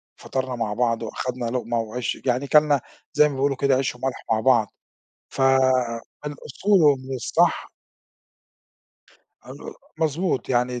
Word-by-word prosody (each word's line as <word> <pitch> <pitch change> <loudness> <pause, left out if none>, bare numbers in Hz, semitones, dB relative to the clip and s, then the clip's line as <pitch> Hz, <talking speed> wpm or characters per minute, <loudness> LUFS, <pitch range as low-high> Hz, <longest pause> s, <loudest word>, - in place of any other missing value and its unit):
فطرنا 130 -1 -4
مع 115 -3 -2
بعض 115 0 0
وأخدنا 125 +2 -4
لقمة 120 -1 -2
وعيش 115 +2 -3
يعني 130 +2 0
كَلنا 150 -1 +4 0.3
زي 150 0 +5
ما - - -6
بيقولوا 135 0 0
كده 140 -1 +2
عيش 130 -1 -1
و - - -16
ملح 135 -1 -3
مع 110 - +3
بعض 115 -3 +3 0.6
ف - - -5
آآ 130 -3 +2 0.2
من 150 - -3
الأصول 190 +7 0
ومن 135 -3 +2
الصح 120 - 0 1.7
أ - - -13
أ - - -8 0.4
مضبوط 160 0 -1
يعني 125 0 0
130 Hz, 150 wpm, -23 LUFS, 120-140 Hz, 1.7 s, زي